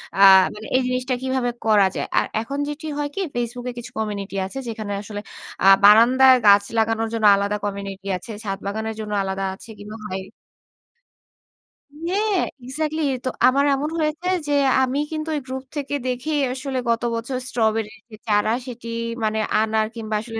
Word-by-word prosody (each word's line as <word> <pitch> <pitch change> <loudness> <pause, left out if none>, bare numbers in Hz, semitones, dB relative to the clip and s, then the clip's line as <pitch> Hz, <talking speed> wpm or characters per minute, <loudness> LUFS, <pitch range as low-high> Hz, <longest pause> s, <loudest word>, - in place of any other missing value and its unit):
অ্যা 195 0 +6 0.3
মানে 210 +1 -9
এই 260 - +4
জিনিসটা 255 0 -1
কীভাবে 260 -2 0 0.2
করা 210 -3 +5
যায়?" - - -2
আর - - +3 0.2
এখন 275 +5 -5
যেটি 300 +2 -6
হয় 290 - -1
কি? 390 - -1
Facebook 240 +1 -3
এ - - -3
কিছু 235 - -9
কমিউনিটি 205 -2 -4
আছে। 190 - -8
যেখানে 215 -2 -5
আসলে 205 0 -7 0.4
আ - - +5 0.2
বারান্দায় 250 +5 +7
গাছ 200 0 +7
লাগানোর 225 0 +1
জন্য 225 -1 0
আলাদা 200 +1 -1
কমিউনিটি 200 -1 -5
আছে। 220 - -10
ছাদ 195 -2 -3
বাগানের 220 +2 -3
জন্য 210 -1 -5
আলাদা 190 0 -3
আছে 210 - -13
কিংবা 210 +2 -9
হয় 190 0 -4 1.8
হ্যাঁ। 400 +1 +1 0.2
এক্সাক্টলি। 310 +4 -2
এ - - -1
তো 255 - +1 0.2
আমার 280 +2 +3
এমন 290 +3 -2
হয়েছে 310 +3 -1 0.2
যে, 290 - 0 0.3
আমি 260 +2 0
কিন্তু 315 0 -4
ওই - - 0
গ্রুপ 260 0 -5
থেকে 285 -1 -3
দেখেই 285 +4 -1
আসলে 265 0 -4
গত 230 - +1
বছর 235 +3 -3
স্ট্রবেরি 220 -2 0 0.2
এ - - -6
চারা, 210 0 +2 0.2
সেটি 240 -2 -8 0.4
মানে 220 0 0 0.2
আনার 220 0 +1
কিংবা 220 -2 -4
আসলে 225 -1 -6
230 Hz, 175 wpm, -22 LUFS, 210-265 Hz, 1.8 s, বারান্দায়